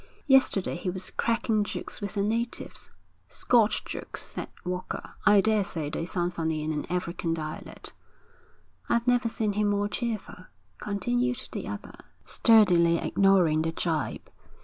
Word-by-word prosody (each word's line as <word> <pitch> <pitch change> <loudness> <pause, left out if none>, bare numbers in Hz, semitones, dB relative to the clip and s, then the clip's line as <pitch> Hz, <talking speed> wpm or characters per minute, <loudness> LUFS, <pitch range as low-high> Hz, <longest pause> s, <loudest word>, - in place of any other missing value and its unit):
Yesterday 265 - +3
he 180 - -3
was 185 +1 -3
cracking 230 -2 +1
jokes 205 - -6
with 205 +1 -4
the 200 - +1
natives.' 230 +3 -2 0.4
'Scotch 230 -3 +2
jokes,' - - -5
said - - -5 0.2
Walker. 180 0 -4 0.2
'I 205 -1 +7
daresay 195 -8 0
they 165 +2 -3
sound 175 -1 -1
funny 160 -2 -2
in 155 - -1
an 150 -1 -3
African 170 -2 -2
dialect.' 155 -1 -7 1.0
'I've 235 0 +2
never 245 -1 +2
seen 215 -2 -1
him 210 +1 +1
more 205 0 +1
cheerful,' 215 -6 -4 0.3
continued 245 +5 -1
the - - -5
other, - - -7 0.3
sturdily 180 -7 +5
ignoring 180 -5 +3
the 160 0 -1
gibe. 160 -3 -2
195 Hz, 140 wpm, -27 LUFS, 170-220 Hz, 1.0 s, I